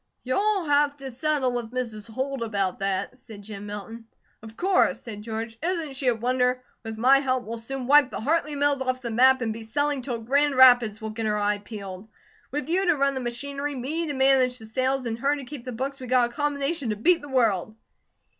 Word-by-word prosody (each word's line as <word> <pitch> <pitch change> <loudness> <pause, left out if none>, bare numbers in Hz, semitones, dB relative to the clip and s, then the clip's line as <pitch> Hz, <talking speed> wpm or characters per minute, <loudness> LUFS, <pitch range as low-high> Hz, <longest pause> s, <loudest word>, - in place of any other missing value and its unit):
"You'll 395 +9 +1
have 290 -1 +2
to 270 -1 -7
settle 280 0 0
with 240 -2 -3
Mrs. 230 -3 -5
Holt 265 +3 -3
about 200 -5 -1
that," 195 +6 -2
said 215 -5 -12
Jim 205 0 -8
Milton. 215 +3 -7 0.4
"Of 220 0 -12
course," 375 +1 +2
said 210 -3 -8
George. 225 +1 -5
"Isn't 330 -4 -2
she 265 0 -3
a 245 - +4
wonder? 250 +2 0 0.2
With 225 -1 -6
my 260 +4 +5
help, 255 -2 0
we'll 230 +1 -5
soon 260 +3 -5
wipe 285 0 +6
the - - -5
Hartley 300 +3 0
mills 285 -1 +1
off 255 -1 -1
the 235 - -3
map, 260 +3 +5
and 225 -2 -1
be 225 - -8
selling 285 +5 -1
till 245 -2 -3
Grand 280 +5 +1
Rapids 245 -5 +6
will 220 0 -4
get 220 0 -3
her 210 0 +1
eye 205 0 0
peeled. 200 -1 -9 0.4
With 295 +2 -3
you 365 +3 +1
to 345 - +4
run 275 0 +2
the 265 - -3
machinery, 280 +4 -4
me 305 +7 -3
to 290 - -2
manage 265 -1 +3
the 220 - -11
sales, 255 +4 -1
and 230 -1 -3
her 280 +3 +2
to 280 -2 -7
keep 270 -2 -9
the 255 - -4
books, 270 +4 -4
we 255 - -7
got 245 -1 +3
a - - -18
combination 285 -1 -1
to 215 - 0
beat 335 +11 +3
the 290 - -10
world." 220 -6 +1
255 Hz, 220 wpm, -25 LUFS, 225-280 Hz, 0.4 s, wipe